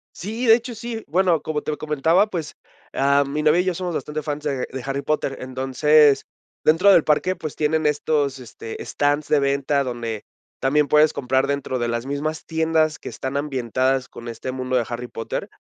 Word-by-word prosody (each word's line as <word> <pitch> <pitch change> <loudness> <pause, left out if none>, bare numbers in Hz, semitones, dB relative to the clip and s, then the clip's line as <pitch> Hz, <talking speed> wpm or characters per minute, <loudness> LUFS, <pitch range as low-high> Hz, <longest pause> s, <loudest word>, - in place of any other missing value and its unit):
Sí, 220 +7 -4
de 225 - +9
hecho, 240 +1 -5
sí. 225 0 -6
Bueno, 175 0 +2
como 150 -1 -3
te 155 - -3
comentaba, 160 +6 +2
pues, 170 -7 -5 0.4
ah, 140 +1 +3
mi 150 +2 -2
novia 155 +3 +4
y - - -2
yo 185 - +1
somos 180 0 -4
bastante 155 0 -3
fans 150 0 -4
de 145 -3 -1
de 130 -1 -6
Harry 135 +1 -2
Potter. 145 -2 -1
Entonces, 135 +3 +3 0.4
dentro 170 +6 +5
del 170 - +6
parque, 170 +5 +1
pues, 155 -5 -6
tienen 155 +1 0
estos, 145 -2 0
este, 115 -2 -8
stands 145 +1 0
de 150 - +3
venta, 140 0 +1
donde 120 -4 -4 0.4
también 145 +2 +2
puedes 150 +2 +4
comprar 130 +1 +1
dentro 140 -2 -2
de 120 -1 -1
las 120 +1 -2
mismas 150 +3 -3
tiendas 160 -1 +1
que - - -8
están 130 +1 -4
ambientadas 130 -2 0
con 120 - -10
este 120 +2 -5
mundo 130 0 -3
de 120 -2 +2
Harry 120 +1 -5
Potter. 115 -1 -5
145 Hz, 190 wpm, -22 LUFS, 130-155 Hz, 0.4 s, de